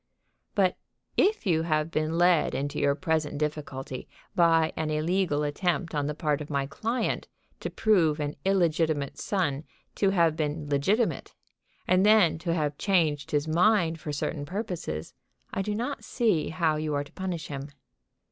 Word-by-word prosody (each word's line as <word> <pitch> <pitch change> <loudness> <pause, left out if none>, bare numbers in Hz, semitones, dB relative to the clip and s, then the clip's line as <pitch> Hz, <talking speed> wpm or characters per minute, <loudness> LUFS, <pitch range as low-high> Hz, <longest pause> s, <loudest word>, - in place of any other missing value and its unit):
"But 190 -3 +2 0.4
if 420 - +2
you 165 -4 +2
have 155 -1 0
been 155 +1 0
led 175 -6 +3
into 140 +2 -2
your 140 -1 +2
present 155 -1 -1
difficulty 145 -3 -4 0.3
by 165 -2 +4
an 155 -1 -2
illegal 155 0 +1
attempt 170 +3 -1
on 145 -1 0
the 150 - -3
part 150 -1 0
of 150 - -7
my 140 -2 0
client 225 - -2 0.3
to - - -4
prove 170 -8 +2
an 145 0 -2
illegitimate 160 -6 +1
son 155 -8 -1 0.3
to 195 - +2
have 170 -5 +3
been 150 -1 -2
legitimate, 190 - 0 0.5
and 185 +1 +4
then 205 -6 +5
to 170 +1 -2
have 150 -3 -1
changed 155 -8 +1
his 145 +1 0
mind 170 0 +3
for 150 - -5
certain 145 +1 -3
purposes, 175 - -4 0.4
I - - 0
do 210 +1 -2
not 245 +6 -3
see 215 -11 +1
how 160 -2 +1
you 155 -1 -2
are 145 - 0
to 145 - -17
punish 180 -4 -4
him. 140 0 -5
160 Hz, 160 wpm, -27 LUFS, 150-185 Hz, 0.5 s, then